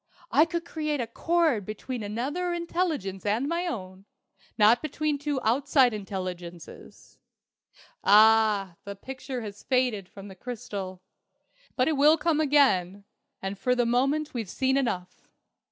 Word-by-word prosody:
"I 310 - +5
could 340 0 -4
create 305 -3 -2
a 240 - -1
cord 315 - +1
between 220 +5 -6
another 275 - -2
intelligence 335 - -2
and 220 +6 0
my 340 +3 -1
own, 190 - -6 0.5
not 225 +2 +5
between 305 -1 -2
two 290 -1 -2
outside 260 +1 +3
intelligences. 185 -4 -8 0.8
Ah, 210 -3 +5
the 200 0 -7
picture 260 +3 -6
has 210 -2 -8
faded 250 -8 0
from 200 0 -11
the 195 - -10
crystal! 190 -4 -7 0.7
But 255 - +2
it 315 -3 +1
will 300 +3 +6
come 320 -1 +1
again. 230 - +3 0.4
And 195 0 -4
for 250 +5 +1
the 245 -1 +2
moment 275 +6 +1
we've 225 -6 -4
seen 265 +5 0
enough. 185 -10 -3
245 Hz, 135 wpm, -27 LUFS, 200-290 Hz, 0.8 s, will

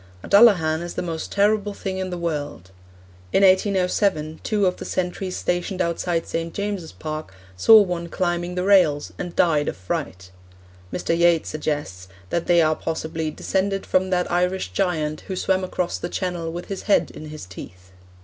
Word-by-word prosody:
A - - -8
Dullahan 180 -7 +5
is 175 0 -6
the - - -2
most 165 -2 -4
terrible 205 0 +2
thing 190 -1 -4
in 185 0 -3
the 180 - -4
world. 145 - -4 0.6
In 195 - +3
1807 185 -4 +2
two 210 -2 +1
of 180 -1 +1
the - - -7
sentries 185 +1 -3
stationed 175 +2 -2
outside 170 -1 -1
St. 165 0 -3
James's 200 -5 -3
Park 155 -10 -6 0.2
saw 220 - +8
one 175 -2 -4
climbing 175 -1 -1
the 180 - -1
railings, 185 -7 +4
and 175 -1 -5
died 150 -4 +3
of - - -3
fright. 90 0 -5 0.6
Mr. 170 - -1
Yeats 170 -1 +3
suggests 145 -12 -4 0.2
that 170 - -1
they 170 -1 +5
are 155 0 +2
possibly 160 0 -3
'descended 195 +5 -1
from 185 0 +1
that 180 -1 0
Irish 180 +2 0
giant 155 -5 -1
who 190 - -3
swam 190 +1 0
across 180 -1 -2
the 175 - -4
Channel 175 -4 -3
with 175 +1 -6
his 195 -2 -5
head 200 - +3
in 155 - -9
his 155 -5 -8
teeth.' 90 0 -12
175 Hz, 175 wpm, -23 LUFS, 155-190 Hz, 0.6 s, saw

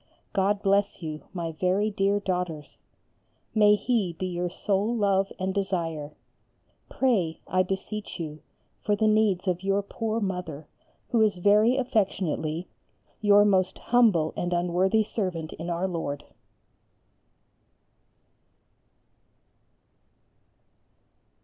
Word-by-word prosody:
God 200 +1 +1
bless 200 -2 +1
you, 155 -1 -5
my 170 -3 -4
very 185 +6 0
dear 200 0 +1
daughters. 180 -6 -4 0.7
May 210 -1 +6
He 210 -4 0
be 185 - -4
your 180 -1 -2
sole 200 +5 -1
love 195 -3 +1
and 190 0 -2
desire. 165 -7 -2 0.7
Pray, 195 -12 +1
I 185 +1 +2
beseech 195 +3 -4
you, 155 -2 -6 0.4
for 210 - +2
the 215 +1 +1
needs 215 -3 +2
of 180 -1 0
your 195 +1 +1
poor 225 +2 -3
Mother, 180 -7 -4 0.5
who 230 - +3
is 210 -4 +3
very 210 +7 +4
affectionately 185 - -1 0.5
Your 205 -1 +6
most 190 -2 +2
humble 215 -10 +3
and 175 0 -2
unworthy 180 +5 +2
servant 180 -7 -3
in 165 +2 -6
our 175 +2 -1
Lord. 160 -5 -4
190 Hz, 110 wpm, -26 LUFS, 175-210 Hz, 0.7 s, May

